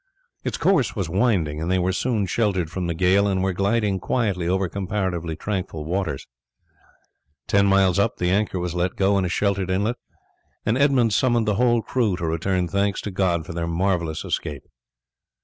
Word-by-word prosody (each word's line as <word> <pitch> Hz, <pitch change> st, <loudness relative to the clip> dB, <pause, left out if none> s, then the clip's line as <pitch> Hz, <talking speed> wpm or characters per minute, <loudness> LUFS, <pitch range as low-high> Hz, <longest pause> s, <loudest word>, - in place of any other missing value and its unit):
Its -, -, -2 dB
course 165 Hz, -11 st, +2 dB
was 95 Hz, -6 st, -3 dB
winding 90 Hz, -8 st, +1 dB
and 80 Hz, -, -2 dB
they 95 Hz, -, +2 dB
were 90 Hz, +1 st, 0 dB
soon 110 Hz, -1 st, 0 dB
sheltered 95 Hz, -5 st, 0 dB
from 90 Hz, 0 st, -3 dB
the 85 Hz, -, -2 dB
gale 95 Hz, +3 st, +3 dB
and 95 Hz, -1 st, 0 dB
were 95 Hz, -1 st, 0 dB
gliding 100 Hz, +1 st, +1 dB
quietly 100 Hz, -6 st, -1 dB
over 95 Hz, +1 st, +1 dB
comparatively 90 Hz, -3 st, -3 dB
tranquil 90 Hz, -4 st, -4 dB
water. 85 Hz, -4 st, -1 dB, 1.3 s
Ten 100 Hz, 0 st, +3 dB
miles 95 Hz, -2 st, +3 dB
up 105 Hz, +2 st, +1 dB
the 90 Hz, 0 st, 0 dB
anchor 100 Hz, 0 st, +1 dB
was 90 Hz, -1 st, -3 dB
let 90 Hz, +1 st, -1 dB
go 100 Hz, +1 st, +2 dB
in 95 Hz, -, 0 dB
a -, -, -1 dB
sheltered 100 Hz, 0 st, 0 dB
inlet, 105 Hz, +6 st, 0 dB, 0.7 s
and 110 Hz, -, +2 dB
Edmund 130 Hz, -5 st, +3 dB
summoned 120 Hz, 0 st, +2 dB
the 105 Hz, -, +2 dB
whole 120 Hz, +1 st, +2 dB
crew 110 Hz, -5 st, 0 dB
to 85 Hz, -, -3 dB
return 90 Hz, +3 st, 0 dB
thanks 100 Hz, +2 st, 0 dB
to 105 Hz, -, -5 dB
God 90 Hz, -4 st, 0 dB
for -, -, -7 dB
their 85 Hz, 0 st, -3 dB
marvellous 85 Hz, -2 st, -1 dB
escape. 75 Hz, -3 st, -3 dB
95 Hz, 185 wpm, -23 LUFS, 90-105 Hz, 1.3 s, gale